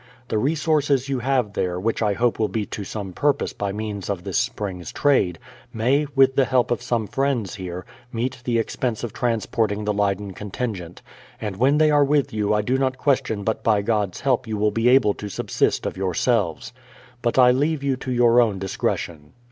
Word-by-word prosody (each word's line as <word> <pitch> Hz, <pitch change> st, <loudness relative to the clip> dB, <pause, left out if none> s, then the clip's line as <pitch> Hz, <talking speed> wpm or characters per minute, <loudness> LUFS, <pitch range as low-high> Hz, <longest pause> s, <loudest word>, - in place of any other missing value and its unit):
The 110 Hz, -, +1 dB
resources 145 Hz, -1 st, +1 dB
you 135 Hz, -2 st, 0 dB
have 125 Hz, -4 st, 0 dB
there, 90 Hz, -2 st, -1 dB
which 115 Hz, +5 st, -1 dB
I 105 Hz, -2 st, +2 dB
hope 120 Hz, +3 st, 0 dB
will 110 Hz, -, +2 dB
be 110 Hz, -2 st, -2 dB
to 105 Hz, -, -6 dB
some 100 Hz, -2 st, -6 dB
purpose 145 Hz, +5 st, 0 dB
by 100 Hz, -1 st, -3 dB
means 105 Hz, -2 st, -5 dB
of 95 Hz, -3 st, -3 dB
this -, -, 0 dB
spring's 95 Hz, -4 st, -4 dB
trade, 130 Hz, -, +2 dB, 0.3 s
may, 130 Hz, +6 st, +1 dB
with 135 Hz, -1 st, +5 dB
the 135 Hz, -, +4 dB
help 125 Hz, -2 st, +1 dB
of 120 Hz, -, 0 dB
some 120 Hz, -2 st, -1 dB
friends 135 Hz, -5 st, -1 dB
here, 90 Hz, -2 st, -6 dB, 0.3 s
meet 125 Hz, +2 st, -3 dB
the 120 Hz, -2 st, 0 dB
expense 115 Hz, 0 st, -2 dB
of 120 Hz, -, -4 dB
transporting 110 Hz, -2 st, -1 dB
the 105 Hz, -, +1 dB
Leyden 100 Hz, -1 st, -1 dB
contingent, 100 Hz, -4 st, -5 dB, 0.4 s
and 105 Hz, -3 st, -4 dB
when 135 Hz, +8 st, +3 dB
they 155 Hz, 0 st, +4 dB
are 145 Hz, -1 st, +5 dB
with 145 Hz, -2 st, +1 dB
you 105 Hz, -1 st, 0 dB
I 105 Hz, 0 st, +2 dB
do 130 Hz, +5 st, 0 dB
not 130 Hz, -1 st, 0 dB
question 130 Hz, -8 st, 0 dB
but 110 Hz, +1 st, -2 dB
by 105 Hz, -3 st, +2 dB
God's 105 Hz, -4 st, -1 dB
help 130 Hz, -2 st, +1 dB
you 110 Hz, -1 st, -3 dB
will 105 Hz, 0 st, +2 dB
be 115 Hz, +3 st, +2 dB
able 125 Hz, -5 st, +5 dB
to 105 Hz, -, -7 dB
subsist -, -, 0 dB
of -, -, -3 dB
yourselves. 95 Hz, 0 st, 0 dB, 0.5 s
But 120 Hz, +1 st, 0 dB
I 125 Hz, -1 st, +7 dB
leave 145 Hz, +3 st, 0 dB
you 140 Hz, -1 st, +1 dB
to 130 Hz, -, -5 dB
your 120 Hz, 0 st, +5 dB
own 110 Hz, -5 st, +1 dB
discretion. 85 Hz, -5 st, -3 dB
115 Hz, 200 wpm, -23 LUFS, 100-130 Hz, 0.5 s, I